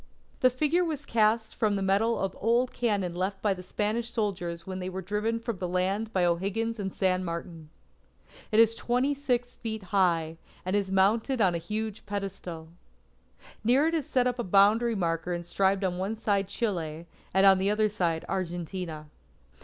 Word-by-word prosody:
The 255 - +5
figure 300 +7 +1
was 305 -4 -3
cast 220 -1 +2
from 210 -2 +1
the 195 - -1
metal 205 +4 +2
of 195 -1 -2
old 240 +3 +2
cannon 205 -7 0
left 190 +2 -2
by 205 -1 +1
the 185 - -8
Spanish 215 +5 -2
soldiers 180 -7 -3
when 190 0 -5
they 185 0 -4
were 185 0 -5
driven 210 +4 -1
from 230 -2 -4
the 180 0 -3
land 190 +5 -1
by 185 -4 +2
O'Higgins 200 +6 -1
and 195 -1 -3
San 185 -1 +1
Martin. 170 -2 -6 0.8
It 215 - +4
is 230 0 +6
twenty 250 +5 0
six 250 -3 -1
feet 220 -2 -5
high, 170 -4 +1 0.3
and 185 +2 0
is 200 -2 0
mounted 220 +7 +2
on 190 -5 +4
a 170 - -1
huge 210 +4 -4
pedestal. 190 -5 -5 0.9
Near 265 +8 +4
it - - -5
is 315 -5 -1
set 250 -1 +2
up 250 0 -1
a - - 0
boundary 210 +5 +4
marker 175 -1 -1
inscribed 190 +3 0
on 180 -1 -1
one 195 +4 -2
side 205 -3 0
Chile, 170 -7 -3 0.3
and 190 +1 +4
on 195 -1 +7
the 195 +1 +1
other, 215 +1 +2 0.4
Argentina. 175 -3 -4
200 Hz, 175 wpm, -28 LUFS, 185-230 Hz, 0.9 s, on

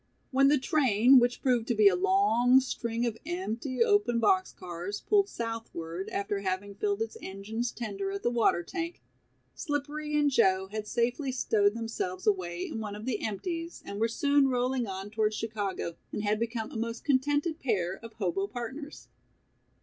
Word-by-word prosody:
When 275 +1 +5
the 295 +1 +5
train, 260 - +5
which 245 0 0
proved 245 -3 +2
to 240 - +1
be 210 -1 +6
a - - +5
long 360 - +4
string 235 -2 -2
of 225 -2 -2
empty, 290 - -1
open 410 - +3
box 375 +9 +3
cars, 180 +3 -6
pulled 400 -2 +3
southward, 195 -7 -5
after 200 0 -2
having 195 +1 -3
filled 410 - 0
its 455 - -8
engine's 215 +5 -4
tender 200 -4 -4
at 200 0 -5
the 240 - +2
water 230 -7 +2
tank, 335 - -5 0.5
Slippery 300 0 -2
and 290 -1 +3
Joe 190 -5 +3
had 215 0 -4
safely 245 +4 0
stowed 215 -4 +2
themselves 225 -5 -4
away 180 -4 0
in - - -5
one 210 -2 -5
of 210 +1 -8
the 240 -5 -2
"empties" 330 - -4
and 200 - -6
were 225 - +3
soon 280 +4 +3
rolling 250 -1 0
on 195 +1 -6
towards 215 0 +1
Chicago, 205 -6 -3 0.2
and 210 - -3
had 210 0 +1
become 230 -1 -3
a - - -5
most 230 +1 -3
contented 290 +4 +1
pair 190 -8 0
of 230 -1 -9
hobo 195 -1 -1
partners. 260 +7 -7
230 Hz, 175 wpm, -29 LUFS, 205-280 Hz, 0.5 s, be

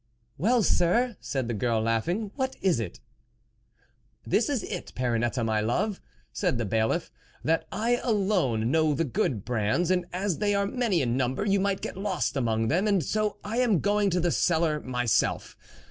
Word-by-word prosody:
"Well, 230 - +3
sir," 225 +8 +2
said 130 -4 -3
the 120 - -2
girl 115 +1 0
laughing, 165 - -1
What 265 -1 -2
is 185 -9 +2
it? 105 -7 -5 0.5
" - - -43
" - - -40
This 230 - +3
is 275 -6 -1
it, 180 - -6
Perrinette, 120 -1 0
my 110 -1 +1
love," 155 - -1 0.3
said 175 - 0
the 115 - -1
Bailiff, 110 +2 0 0.2
" - - -30
that 165 - +1
I 235 +3 +1
alone 185 - +1
know 155 -1 +3
the 165 - +1
good 120 -6 -1
brands, 120 - 0
and 180 -1 +1
as 185 -1 -2
they 205 -1 +1
are 200 0 +1
many 205 - 0
in 120 0 0
number, 130 +8 0
you 200 -1 +2
might 195 0 0
get - - -5
lost 195 -6 -1
among 115 -4 0
them, 180 - +1
and 200 -5 +2
so 215 -1 -1
I 215 +3 -4
am 240 -6 +3
going 205 +2 +2
to 180 0 +1
the 175 0 +1
cellar 160 -3 +1
myself." 125 -4 0
175 Hz, 190 wpm, -27 LUFS, -, 0.5 s, Well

